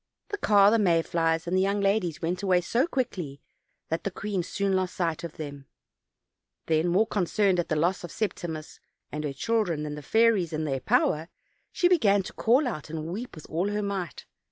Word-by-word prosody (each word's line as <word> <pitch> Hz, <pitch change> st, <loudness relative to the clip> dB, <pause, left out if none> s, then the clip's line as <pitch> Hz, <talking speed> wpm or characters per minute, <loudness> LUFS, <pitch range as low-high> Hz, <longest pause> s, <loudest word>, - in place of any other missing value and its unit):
The 410 Hz, -, -3 dB
car, 205 Hz, -, +5 dB
the 230 Hz, -, +4 dB
may 170 Hz, -5 st, +3 dB
flies 165 Hz, 0 st, 0 dB
and 175 Hz, +2 st, -1 dB
the 185 Hz, -, +3 dB
young 200 Hz, +1 st, +1 dB
ladies 195 Hz, -4 st, 0 dB
went 175 Hz, +3 st, -1 dB
away 185 Hz, -3 st, +3 dB
so 240 Hz, -, +1 dB
quickly 190 Hz, -, -3 dB, 0.5 s
that 165 Hz, -, -2 dB
the -, -, -1 dB
queen 195 Hz, 0 st, -3 dB
soon 195 Hz, +2 st, -1 dB
lost 185 Hz, -1 st, -1 dB
sight 165 Hz, -3 st, -1 dB
of 170 Hz, -2 st, -5 dB
them. 140 Hz, -3 st, -7 dB, 1.0 s
Then, 160 Hz, +1 st, +2 dB
more 185 Hz, +6 st, +3 dB
concerned 195 Hz, -2 st, +1 dB
at 175 Hz, -, -1 dB
the 155 Hz, -, +1 dB
loss 175 Hz, +5 st, +1 dB
of 175 Hz, -, -7 dB
Septimus 170 Hz, -7 st, -4 dB, 0.3 s
and 150 Hz, +1 st, -4 dB
her 145 Hz, -, -2 dB
children 180 Hz, -2 st, 0 dB
than 150 Hz, -1 st, -4 dB
at -, -, -7 dB
the -, -, -6 dB
fairies 220 Hz, -7 st, +3 dB
and 155 Hz, 0 st, -1 dB
their 135 Hz, -3 st, -1 dB
power, 155 Hz, +5 st, +1 dB, 0.4 s
she 355 Hz, -, +3 dB
began 210 Hz, -, +4 dB
to -, -, -8 dB
call 255 Hz, +5 st, +3 dB
out 155 Hz, -10 st, -5 dB
and 160 Hz, -, -4 dB
to 155 Hz, +2 st, -5 dB
weep 230 Hz, +7 st, -6 dB
with 155 Hz, -, -11 dB
all 175 Hz, +5 st, -1 dB
her 210 Hz, 0 st, -1 dB
might. 195 Hz, -6 st, -4 dB
180 Hz, 210 wpm, -27 LUFS, 160-205 Hz, 1.0 s, car